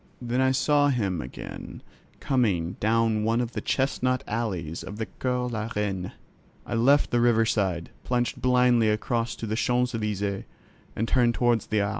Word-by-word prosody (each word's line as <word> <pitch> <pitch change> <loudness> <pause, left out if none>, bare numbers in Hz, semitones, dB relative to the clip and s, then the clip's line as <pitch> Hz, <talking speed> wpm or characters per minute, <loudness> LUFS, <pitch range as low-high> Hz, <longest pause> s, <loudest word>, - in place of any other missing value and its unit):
Then 125 +1 -1
I 130 - +4
saw 145 +2 +3
him 100 - 0
again 65 - -8 0.4
coming 100 -11 0
down 110 0 +2
one 115 +2 +1
of 120 -1 -2
the - - -4
chestnut 130 -2 0
alleys 95 -8 -3
of 105 - -8
the 110 - -2
Cours 125 0 -2
la 110 -1 -3
Reine. 95 -3 -2 0.5
I - - -5
left 135 +5 +3
the 120 - +2
river 115 -2 +4
side, 95 -6 -1
plunged 120 -1 -1
blindly 125 -3 +4
across 115 +2 -1
to - - -6
the 110 0 -2
Champs 125 +2 +1
Elysķes 100 -3 -2 0.5
and 115 - -1
turned 120 -2 +3
toward 120 -2 +2
the 105 -1 +2
Arc. 100 - 0
115 Hz, 170 wpm, -26 LUFS, 105-125 Hz, 0.5 s, I